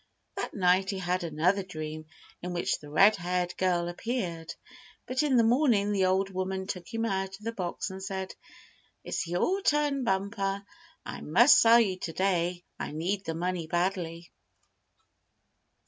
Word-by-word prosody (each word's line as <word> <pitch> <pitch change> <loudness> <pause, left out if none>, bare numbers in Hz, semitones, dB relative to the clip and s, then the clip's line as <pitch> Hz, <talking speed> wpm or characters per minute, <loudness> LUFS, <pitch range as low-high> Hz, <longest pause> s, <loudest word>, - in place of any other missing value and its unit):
That - - -4
night 185 0 +3
he 195 - -2
had 180 -1 -1
another 170 +5 +1
dream 155 -4 -7 0.3
in 180 0 -4
which 175 - -1
the 150 - -12
red 195 +8 +5
haired 180 0 -2
girl 175 -2 +1
appeared; 175 -4 -3 0.5
but 255 +2 0
in 285 -4 +2
the 230 - +5
morning 230 -4 +3
the 195 -2 +2
old 190 +1 +1
woman 190 0 -3
took 180 -3 -6
him 225 0 -1
out 195 -2 -2
of 210 - -19
the 230 - -2
box, 185 -2 -4
and 190 0 -8
said: 190 0 -4 0.7
"It's - - -3
your 265 - 0
turn, 295 -6 +1
Bumper. 195 -1 -1 0.4
I - - -7
must 230 - +6
sell 230 +1 +7
you 190 -5 +1
to 165 - -5
day. 180 -2 0 0.2
I - - -4
need 190 +6 -2
the 165 - -3
money 175 -1 -2
badly." 175 -1 -2
190 Hz, 165 wpm, -29 LUFS, 175-205 Hz, 0.7 s, sell